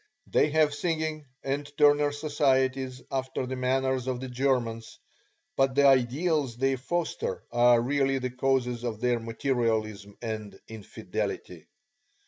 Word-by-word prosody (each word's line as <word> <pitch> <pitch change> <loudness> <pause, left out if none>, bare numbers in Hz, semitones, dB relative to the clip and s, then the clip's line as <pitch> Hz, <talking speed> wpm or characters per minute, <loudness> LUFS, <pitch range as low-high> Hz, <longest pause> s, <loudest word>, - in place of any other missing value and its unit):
They 150 - +2
have 150 -1 +3
singing 155 -1 -2 0.2
and 140 +1 -3
Turner 145 0 +5
societies 135 -3 0
after 130 -1 -2
the 130 +1 -4
manner 130 +1 +1
of 130 -1 -2
the 130 0 -6
Germans, 125 -3 -1 0.6
but 135 -1 +2
the 140 0 +5
ideals 135 +1 +2
they 135 +1 +1
foster 170 +6 -3
are 120 0 +5
really 135 +2 +1
the 130 -1 -3
causes 125 -2 0
of 115 -3 -3
their 120 0 +1
materialism 110 -4 -2
and 110 -3 -6
infidelity. 100 -5 -5
130 Hz, 125 wpm, -28 LUFS, 120-140 Hz, 0.6 s, Turner